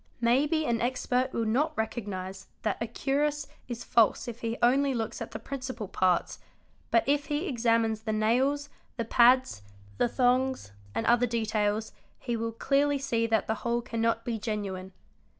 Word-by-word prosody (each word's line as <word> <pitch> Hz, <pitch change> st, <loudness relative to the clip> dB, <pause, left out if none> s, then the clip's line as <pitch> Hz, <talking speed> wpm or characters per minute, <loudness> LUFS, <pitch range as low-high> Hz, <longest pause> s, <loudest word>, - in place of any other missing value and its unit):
May 240 Hz, +5 st, +3 dB
be 315 Hz, 0 st, 0 dB
an 235 Hz, -3 st, 0 dB
expert 255 Hz, +1 st, 0 dB
will 230 Hz, -, -1 dB
not 245 Hz, +7 st, 0 dB
recognise 195 Hz, -4 st, -4 dB, 0.2 s
that 215 Hz, 0 st, -1 dB
a 230 Hz, -, -1 dB
cuirass 285 Hz, +4 st, -1 dB, 0.2 s
is 240 Hz, -2 st, -5 dB
false 230 Hz, 0 st, +3 dB
if 240 Hz, 0 st, -7 dB
he 230 Hz, 0 st, -2 dB
only 270 Hz, +2 st, +3 dB
looks 225 Hz, -2 st, -3 dB
at -, -, -4 dB
the -, -, -6 dB
principal 255 Hz, -5 st, -6 dB
parts, 185 Hz, -1 st, +1 dB, 0.5 s
but 230 Hz, -, +4 dB
if 285 Hz, +1 st, +1 dB
he 300 Hz, +5 st, -2 dB
exa 230 Hz, -5 st, +2 dB
mines 220 Hz, -1 st, -1 dB
the 220 Hz, 0 st, -3 dB
nails, 260 Hz, +7 st, +1 dB, 0.3 s
the 230 Hz, -, -1 dB
pads, 245 Hz, -, +4 dB, 0.4 s
the -, -, +4 dB
thongs, 255 Hz, -, +1 dB, 0.2 s
and 225 Hz, -, -1 dB
other 240 Hz, +1 st, +4 dB
details, 220 Hz, -2 st, 0 dB, 0.3 s
he 240 Hz, -2 st, -3 dB
will 230 Hz, 0 st, -2 dB
clearly 280 Hz, +5 st, +1 dB
see 235 Hz, -4 st, 0 dB
that 225 Hz, -1 st, +1 dB
the 220 Hz, -, 0 dB
whole 235 Hz, 0 st, 0 dB
cannot 230 Hz, 0 st, -1 dB
be 230 Hz, -2 st, -2 dB
genuine. 195 Hz, -4 st, -4 dB
235 Hz, 170 wpm, -28 LUFS, 220-260 Hz, 0.5 s, but